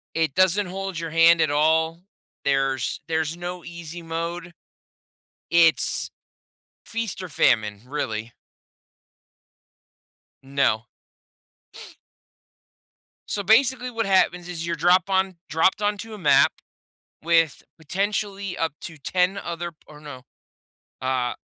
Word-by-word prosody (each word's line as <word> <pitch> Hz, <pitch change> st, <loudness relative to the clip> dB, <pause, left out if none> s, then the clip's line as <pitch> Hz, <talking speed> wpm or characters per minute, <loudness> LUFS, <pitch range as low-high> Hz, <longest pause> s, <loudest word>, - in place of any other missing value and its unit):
It 160 Hz, -4 st, 0 dB
doesn't 185 Hz, +2 st, +3 dB
hold 190 Hz, -1 st, -5 dB
your 165 Hz, -1 st, -4 dB
hand 165 Hz, +1 st, +5 dB
at 155 Hz, -, +2 dB
all. 160 Hz, +3 st, +2 dB, 0.4 s
There's 135 Hz, -2 st, 0 dB
there's 160 Hz, 0 st, -1 dB
no 175 Hz, 0 st, -6 dB
easy 170 Hz, 0 st, -8 dB
mode. 170 Hz, +1 st, -5 dB, 1.0 s
It's 170 Hz, -1 st, +3 dB, 0.8 s
feast 230 Hz, -4 st, -4 dB
or 185 Hz, -, -6 dB
famine, 105 Hz, -7 st, +2 dB
really. 115 Hz, -5 st, -4 dB, 2.1 s
No. 135 Hz, -5 st, +1 dB, 2.4 s
So 200 Hz, -, -2 dB
basically 250 Hz, +4 st, +3 dB
what 230 Hz, -1 st, -1 dB
happens 180 Hz, -2 st, +2 dB
is 170 Hz, -2 st, -5 dB
you're 170 Hz, -, -1 dB
drop 180 Hz, +2 st, +3 dB
on 190 Hz, -1 st, +1 dB
dropped 160 Hz, +7 st, +2 dB
onto 210 Hz, +2 st, -2 dB
a -, -, -7 dB
map 140 Hz, -7 st, +5 dB, 0.7 s
with, 165 Hz, -2 st, +2 dB, 0.2 s
potentially, 195 Hz, +3 st, -2 dB
up 165 Hz, -1 st, -1 dB
to 165 Hz, -2 st, -8 dB
10 180 Hz, +6 st, 0 dB
other 170 Hz, -1 st, -5 dB
p 155 Hz, -, -38 dB
or 150 Hz, -1 st, -14 dB
no 145 Hz, -4 st, -10 dB, 0.8 s
uh, 130 Hz, -2 st, 0 dB
170 Hz, 110 wpm, -24 LUFS, 150-190 Hz, 2.4 s, hand